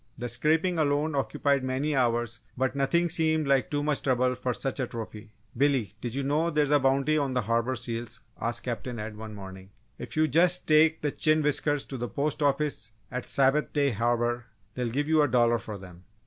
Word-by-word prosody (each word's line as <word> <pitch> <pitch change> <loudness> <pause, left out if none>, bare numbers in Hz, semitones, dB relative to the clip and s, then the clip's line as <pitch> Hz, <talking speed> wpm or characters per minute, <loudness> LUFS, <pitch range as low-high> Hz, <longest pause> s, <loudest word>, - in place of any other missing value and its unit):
The 120 0 -4
scraping 160 +8 +1
alone 150 +1 +1
occupied 140 0 0
many 135 +3 -1
hours 120 -3 0 0.2
but 130 +1 0
nothing 170 +5 +2
seemed 160 -2 0
like 135 -4 +2
too 145 0 -1
much 150 -1 0
trouble 125 -1 +1
for 125 0 -2
such 135 +3 -4
a 130 - -1
trophy! 110 -2 -8 0.3
"Billy, 130 -6 +1
did 120 0 -4
you 140 - -1
know 150 +5 +1
there's 150 -3 +1
a 145 - +5
bounty 135 +3 +2
on 135 -3 -1
the 125 - +2
Harbour 115 +3 0
seals?" 115 -1 -5 0.2
asked 120 +1 -2
Captain 120 0 -4
Ed, 105 0 -6
one 110 0 -8
morning. 95 -1 -10 0.3
"If - - -7
you 155 0 +4
just 175 +5 +3
take 155 +1 +4
the 145 - +1
chin 155 +1 +2
whiskers 145 0 +1
to 135 - -7
the 120 0 -3
Post 150 +2 -2
Office 145 -5 0 0.2
at 125 0 -4
Sabbath 140 +2 +2
Day 140 -2 +2
Harbour 120 +1 0 0.3
they'll 125 -1 -2
give 145 +5 -1
you 155 -1 +4
a 145 - +4
dollar 120 -2 +3
for 105 -2 -7
them." 90 -2 -13
135 Hz, 205 wpm, -27 LUFS, 120-150 Hz, 0.3 s, a